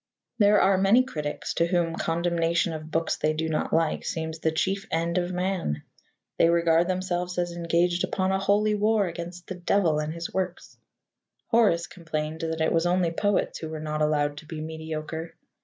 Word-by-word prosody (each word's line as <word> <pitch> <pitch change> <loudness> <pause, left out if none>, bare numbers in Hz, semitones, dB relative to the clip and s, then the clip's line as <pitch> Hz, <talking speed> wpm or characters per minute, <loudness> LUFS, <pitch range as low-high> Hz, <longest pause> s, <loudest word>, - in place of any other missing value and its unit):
There 205 0 +6
are 190 0 +4
many 205 +6 +5
critics 150 - -4
to 170 - +2
whom 170 -2 +1
condemnation 170 0 0
of 155 0 -7
books 165 +1 0
they 155 - +1
do 160 +1 -2
not 155 -1 -1
like 165 -1 +1
seems 160 0 -4
the 160 - +1
chief 190 +5 -1
end 170 +2 0
of 175 0 -2
man. 180 - -2 0.6
They 165 - +6
regard 170 0 +3
themselves 180 -1 -2
as 175 -1 0
engaged 170 +1 +1
upon 190 0 0
a 190 - +1
holy 205 +2 +2
war 210 0 +2
against 175 +1 -6
the - - -5
Devil 175 -3 +1
and 150 0 -2
his 170 +1 -6
works. 185 -2 -3 0.7
Horace 210 -8 +3
complained 155 -2 -4
that 160 0 -2
it 160 - +2
was 165 +1 +2
only 175 -1 +2
poets 205 +4 0
who 160 - -5
were 155 -1 -5
not 155 0 -3
allowed 145 -1 +1
to 155 - -10
be 160 -1 -6
mediocre. 160 +1 -5
170 Hz, 185 wpm, -26 LUFS, 160-185 Hz, 0.7 s, There